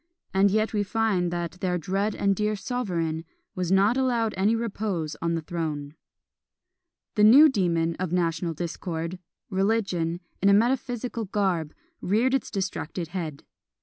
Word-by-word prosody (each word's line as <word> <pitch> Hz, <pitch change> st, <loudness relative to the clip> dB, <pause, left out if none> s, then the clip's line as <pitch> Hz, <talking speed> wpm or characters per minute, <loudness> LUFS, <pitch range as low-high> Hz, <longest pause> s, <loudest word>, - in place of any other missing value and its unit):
And 195 Hz, +1 st, +4 dB
yet 215 Hz, +3 st, +1 dB
we 210 Hz, -, +1 dB
find 205 Hz, -3 st, +1 dB
that 175 Hz, 0 st, -4 dB
"their 180 Hz, -1 st, 0 dB
dread 195 Hz, +5 st, -1 dB
and 200 Hz, -1 st, +1 dB
dear 210 Hz, +2 st, 0 dB
sovereign" 175 Hz, -9 st, -2 dB, 0.3 s
was 180 Hz, -1 st, -2 dB
not 200 Hz, +6 st, +4 dB
allowed 240 Hz, -4 st, +1 dB
any 200 Hz, +4 st, +2 dB
repose 205 Hz, -8 st, -2 dB
on 170 Hz, 0 st, 0 dB
the 165 Hz, -, -3 dB
throne. 155 Hz, -4 st, -4 dB, 1.2 s
A 210 Hz, -, +2 dB
new 255 Hz, +9 st, +9 dB
demon 170 Hz, -, +1 dB
of 185 Hz, -3 st, -3 dB
national 170 Hz, -1 st, 0 dB
discord, 170 Hz, +1 st, -4 dB, 0.3 s
Religion, 190 Hz, -4 st, 0 dB, 0.2 s
in 200 Hz, -, +5 dB
a -, -, +6 dB
metaphysical 240 Hz, +1 st, 0 dB
garb, 185 Hz, -6 st, -1 dB, 0.3 s
reared 225 Hz, +8 st, +2 dB
its 270 Hz, -, 0 dB
distracted 175 Hz, -3 st, -3 dB
head. 160 Hz, -5 st, -5 dB
190 Hz, 145 wpm, -26 LUFS, 170-215 Hz, 1.2 s, new